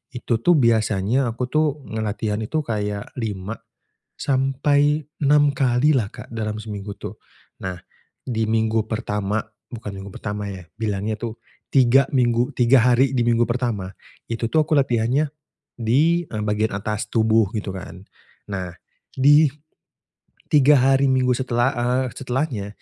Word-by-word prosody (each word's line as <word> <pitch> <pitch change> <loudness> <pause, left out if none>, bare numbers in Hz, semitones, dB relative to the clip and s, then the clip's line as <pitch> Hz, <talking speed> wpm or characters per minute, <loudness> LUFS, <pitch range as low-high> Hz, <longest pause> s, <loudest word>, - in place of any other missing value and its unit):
itu 120 -1 -1
tuh 175 - +5
biasanya 115 -1 +2
aku 120 +2 -3
tuh, 155 0 +3 0.2
nge 110 0 -4
latihan 105 0 -2
itu 135 +9 -1
kayak 105 -4 -3
5 105 -2 -4 0.6
sampai 145 +3 +1 0.2
6 145 0 +4
kali 130 +2 +3
lah 115 -6 +1
Kak, - - -11
dalam 105 -2 -3
seminggu 100 -1 -6
tuh. - - -8 0.5
Nah, 95 -1 -4 0.5
di 115 -3 -1
minggu 110 0 +1
pertama 105 -1 -2 0.3
bukan 110 -4 -7
minggu 95 - -8
pertama 105 0 -4
ya, 95 -2 -8 0.2
bilangnya 105 0 -2
itu, 115 -1 -5 0.3
3 130 0 +4
minggu 120 -1 +2
3 125 +1 +5
hari 130 +2 +3
di 130 - 0
minggu 120 0 +3
pertama, 120 -6 -2 0.4
itu 115 0 -2
tuh, 155 +4 +2
aku 155 - -6
latihannya 130 +2 +2 0.5
di, 150 +9 +2
eee, 105 -1 -4
bagian 105 0 0
atas 105 +2 -3
tubuh, 110 -1 +3
gitu 105 -2 -3
kan. 90 0 -9 0.5
Nah, 90 -3 -4 0.4
di 145 +3 +6 1.0
3 145 0 +6
hari 135 +1 +3
minggu 130 -1 +2
setelah, 125 0 +1
eee, 125 +2 0
setelahnya, 130 -5 -2
120 Hz, 140 wpm, -22 LUFS, 105-135 Hz, 1.0 s, di